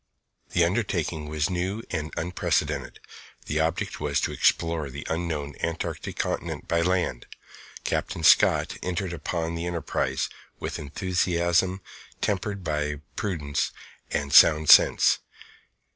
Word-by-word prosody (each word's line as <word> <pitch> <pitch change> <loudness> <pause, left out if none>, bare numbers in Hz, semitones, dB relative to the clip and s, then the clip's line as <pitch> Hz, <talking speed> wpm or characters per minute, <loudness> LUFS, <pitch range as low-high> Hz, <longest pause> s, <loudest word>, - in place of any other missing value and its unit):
The 85 - +4
undertaking 85 -6 -1
was 75 +4 -1
new 95 +5 -2
and 80 -2 -3
unprecedented. 75 -5 -1 0.5
The 75 - -1
object 80 +2 -1
was 75 -1 0
to - - -1
explore 80 -3 +1
the 70 +2 -8
unknown 80 -4 -2
Antarctic 85 0 -3
Continent - - -3
by 85 0 +1
land. 90 -8 0 0.6
Captain 80 - -2
Scott - - +5
entered 90 0 -2
upon 85 +1 -3
the 85 +1 -3
enterprise 85 -3 -1 0.3
with - - -4
enthusiasm 90 +3 0 0.4
tempered 100 -1 -2
by 75 -2 -2
prudence 75 -8 -1 0.4
and 70 0 -2
sound 75 +1 +7
sense. - - +6
85 Hz, 115 wpm, -26 LUFS, 75-90 Hz, 0.6 s, sound